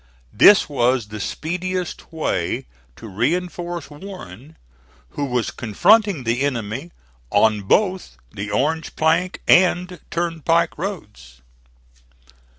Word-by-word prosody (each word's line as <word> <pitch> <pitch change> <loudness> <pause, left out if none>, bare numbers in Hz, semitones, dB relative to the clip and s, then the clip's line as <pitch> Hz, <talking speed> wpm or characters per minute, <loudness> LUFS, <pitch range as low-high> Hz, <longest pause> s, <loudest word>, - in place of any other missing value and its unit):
This 205 - +7
was 125 -5 +1
the 105 0 -7
speediest 180 - -4
way 160 -1 -2 0.3
to 115 - -11
reinforce 170 - -2
Warren 150 - -11 0.5
who 145 - -3
was 125 -3 -1
confronting 195 - +3
the 120 +2 0
enemy 130 +2 -2 0.4
on 105 0 +3
both 185 - 0
the 100 +1 -6
Orange 150 +9 -1
plank 165 +3 +1
and 180 0 +3
turnpike 165 0 0
roads. 105 - -7
155 Hz, 100 wpm, -21 LUFS, 115-180 Hz, 0.5 s, This